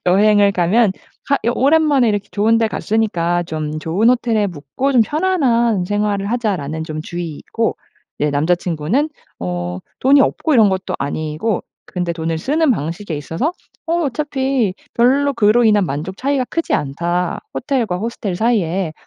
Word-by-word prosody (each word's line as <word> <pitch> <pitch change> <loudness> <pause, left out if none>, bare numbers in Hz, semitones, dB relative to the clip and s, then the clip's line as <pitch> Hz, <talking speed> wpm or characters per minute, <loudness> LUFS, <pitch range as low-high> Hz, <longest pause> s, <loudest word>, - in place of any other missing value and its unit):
여행을 200 +2 +4
가면 195 +4 +3 0.4
가 280 - +3
여 235 - +2
'오랜만에 285 -3 +3
이렇게 205 -1 -1
좋은 220 +2 +3
데 225 - +2
갔으니까 180 -6 0
좀 155 -2 -4
좋은 180 +9 +1
호텔에 230 -4 +2
묵고 175 - -3
좀 245 - +5
편안한 245 - +1
생활을 205 0 -1
하자.'라는 185 -10 -2
좀 155 -1 -5
주의이고 175 +7 -3 0.4
이제 150 0 +1
남자 155 +5 +2
친구는 175 - -1 0.3
어 90 0 -3 0.2
돈이 275 +2 +5
없고 310 +2 0
이런 215 -4 +5
것도 190 0 -3
아니고 155 +8 -2 0.2
근데 175 -2 -3
돈을 165 -1 -2
쓰는 295 - +1
방식에 165 - -2
있어서 165 - -2 0.3
'어 340 +1 +1
어차피 265 -6 -1 0.2
별로 275 +4 +3
그로 235 0 +3
인한 210 -3 +4
만족 155 +6 -4
차이가 275 +1 0
크지 330 - -2
않다, 170 +5 -1
호텔과 240 -8 -1
호스텔 215 -4 -3
사이에. 190 -6 0
205 Hz, 325 characters per minute, -18 LUFS, 170-245 Hz, 0.4 s, 좀